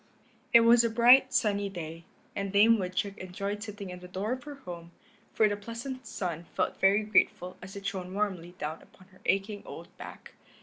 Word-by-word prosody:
It 235 -2 +8
was 230 +1 +6
a 230 - +2
bright, 240 +4 +6
sunny 205 -3 +1
day, 165 -3 -7 0.3
and 200 -1 -3
Dame 215 +3 +5
Woodchuck 185 +2 -3
enjoyed 200 +3 -4
sitting 205 -3 -7
in 180 - -8
the 180 - -11
door 190 +5 -3
of 255 +1 -4
her 295 -1 -7
home, 175 -10 -9 0.4
for 215 - +4
the 205 - -1
pleasant 235 +5 -7
sun 170 -3 -4
felt - - -1
very 200 +2 +4
grateful 185 -3 +1
as 190 +1 -10
it 200 0 -8
shone 185 0 -4
warmly 185 -4 -2
down 155 +2 -5
upon 185 0 -20
her 185 0 -22
aching 200 +2 0
old - - -11
back. - - -10
200 Hz, 190 wpm, -29 LUFS, 180-220 Hz, 0.4 s, It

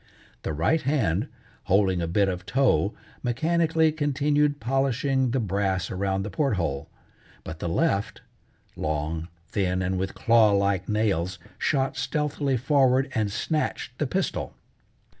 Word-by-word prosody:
The - - -3
right 85 - +1
hand, 110 - +1 0.4
holding 95 -2 +2
a 85 - -1
bit 100 +4 +2
of 90 -1 -3
tow, 110 - +2 0.3
mechanically 160 +5 +2
continued 145 -1 +1
polishing 135 +1 +1
the 130 +3 0
brass 95 -3 -1
around 95 0 -1
the 105 - -5
port 135 +2 +1
hole, 75 -7 -2 0.5
but 80 - -7
the 85 - -2
left 110 - 0 0.5
long, 75 +2 -2 0.2
thin, 95 -2 0
and 95 0 -1
with 95 0 -3
claw 115 -3 +4
like 100 -2 +1
nails, 95 -4 0 0.2
shot 135 -2 +1
stealthily 145 -1 -1
forward 135 0 +3
and 110 -4 0
snatched 150 +8 -2
the - - +1
pistol. - - -2
110 Hz, 135 wpm, -26 LUFS, 95-135 Hz, 0.5 s, claw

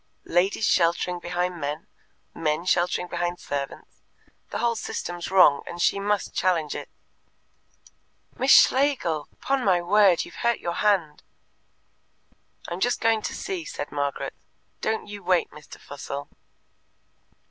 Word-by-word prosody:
Ladies 190 +5 +1
sheltering 175 +1 +2
behind 175 0 -3
men, 145 +3 -3 0.5
men 155 +1 -1
sheltering 180 0 +1
behind 175 0 -2
servants 140 -1 -6 0.5
the - - -4
whole 235 -1 +1
system's 175 -5 -5
wrong, 180 -7 +6
and 170 - -7
she 200 - +2
must 205 +1 -1
challenge 170 -5 +1
it. - - -7 1.5
"Miss 265 - -1
Schlegel! 255 - +4
'Pon 275 -1 0
my 185 -4 +3
word, 185 0 +4
you've - - -11
hurt 235 -1 +2
your 170 - -3
hand." 190 -8 +1 1.5
"I'm 175 - -5
just 245 +5 +1
going 225 -1 +2
to - - -4
see," 380 -4 -4
said 145 - -6
Margaret. 145 -1 -2 0.5
"Don't 220 0 -1
you 205 0 -8
wait, 180 -1 +1
Mr. 150 -1 -13
Fussell." 140 0 -7
180 Hz, 130 wpm, -25 LUFS, 165-210 Hz, 1.5 s, wrong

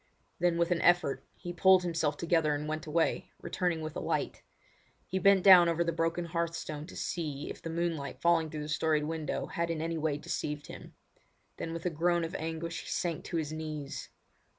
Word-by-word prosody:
Then 175 -1 +2
with 170 +1 +1
an 170 - +2
effort 175 -6 +3
he 175 - -6
pulled 185 +1 +6
himself 165 -4 0
together 165 -3 +2
and 150 +1 -4
went 155 0 -3
away, 160 +2 0
returning 175 -3 -1
with 155 -1 -5
a - - -2
light. - - -2 0.6
He 190 - -2
bent 195 0 +5
down 180 -3 +9
over 170 +1 +1
the 170 - 0
broken 165 +1 -1
hearth 170 0 -2
stone 155 -1 -5
to - - -11
see 150 -5 -3
if - - -10
the 165 - -5
moonlight 165 -4 -2
falling 170 -2 +3
through 150 -1 -5
the - - -6
storied 155 0 +1
window 160 0 -2
had 170 0 -2
in 165 -2 -1
any 165 0 -2
way 150 -2 0
deceived 150 0 -4
him. - - -11 0.6
Then 165 - -4
with 165 +1 -6
a 180 - +1
groan 170 +2 +1
of 165 - -4
anguish 165 +1 -4
he - - -12
sank 170 -3 -2
to 170 - -2
his 155 -1 -2
knees. 155 -3 -5
165 Hz, 205 wpm, -31 LUFS, 155-170 Hz, 0.6 s, down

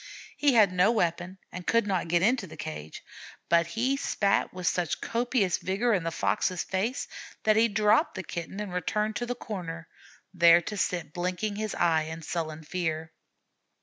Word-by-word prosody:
He 285 -3 +3
had 205 -5 +5
no 180 +5 +4
weapon 175 -3 -1
and 180 0 -8
could 230 -2 +3
not 190 -4 -1
get 170 +1 +2
into 225 -2 +2
the - - -12
cage, 75 0 -7 0.5
but 170 -1 +4
he 240 +9 0
spat 200 -7 +1
with 180 -1 -7
such 175 -2 0
copious 230 -5 0
vigor 215 +6 0
in 190 - +2
the 165 - -2
Fox's 175 +1 0
face 215 +8 -2 0.4
that 215 0 +4
he 225 +1 +5
dropped 215 +1 +2
the 190 - -4
Kitten 175 +3 -6
and 205 -3 -5
returned 210 +4 -1
to 240 - -3
the 245 - -2
corner, 170 -8 -6 0.5
there 170 -1 +7
to 210 - -5
sit 175 -5 -2
blinking 185 +4 -2
his 215 -1 -3
eyes 160 -2 +2
in 160 0 -7
sullen 160 -1 -4
fear. 160 -1 -3
185 Hz, 180 wpm, -28 LUFS, 170-215 Hz, 0.5 s, there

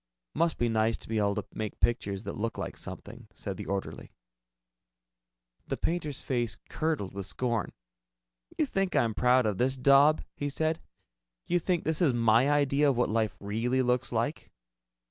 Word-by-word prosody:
"Must 165 +1 +1
be 120 - +1
nice 110 0 +1
to - - -12
be 110 -1 0
able 100 -1 +1
to - - -3
make 110 -1 -5
pictures 100 -4 0
that - - -5
look 115 +1 -3
like - - -4
something," - - -9
said - - -5
the - - -7
orderly. 100 0 -4 1.6
The - - -2
painter's 160 -5 -2
face 120 -3 -1
curdled 155 - -2
with 100 0 -5
scorn. 120 -1 -1 0.9
"You 310 - +3
think 195 -8 -1
I'm 115 -2 +2
proud 125 +3 +3
of 105 -3 -1
this 130 +2 +2
daub?" 140 +4 +5
he 145 - -3
said. 160 +3 -1 0.6
"You 175 - +1
think 175 0 0
this 160 +1 0
is 145 -8 +3
my 115 +3 +4
idea 145 0 +3
of 130 - 0
what 120 - +2
life 110 -4 0
really 115 +6 0
looks 125 +1 +1
like?" 120 +6 -2
125 Hz, 170 wpm, -29 LUFS, 110-145 Hz, 1.6 s, daub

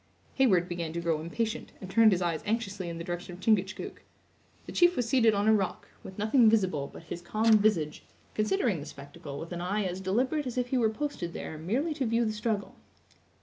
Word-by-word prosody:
Heyward 190 -10 +3
began 170 -2 -4
to 170 - -2
grow 165 -2 0
impatient, 220 +7 -3
and 190 - -8
turned 220 +3 +5
his 185 -1 +1
eyes 165 -2 -1
anxiously 200 -5 -2
in 165 - -5
the 165 - -5
direction 175 +1 -5
of - - -14
Chingachgook. 190 -2 0 0.6
The - - -8
chief 350 0 +4
was 245 - 0
seated 230 -3 +4
on 200 +1 +1
a 220 - +6
rock, 195 -4 -1
with 190 - -10
nothing 220 +2 +5
visible 185 -10 +1
but - - -11
his 170 - -7
calm 215 +4 +3
visage, 175 -8 +1 0.3
considering 210 -2 +1
the 145 - -8
spectacle 140 0 -9
with 165 +4 -7
an 175 -1 -4
eye 200 +4 0
as 185 0 -3
deliberate 255 +10 0
as 250 - -5
if 250 0 0
he 260 - +1
were 225 -2 +3
posted 220 -8 -4
there - - -6
merely 250 - -1
to 270 -4 -2
view 230 +1 +2
the 215 - -1
struggle. 210 -1 -2
205 Hz, 215 wpm, -29 LUFS, 175-230 Hz, 0.6 s, a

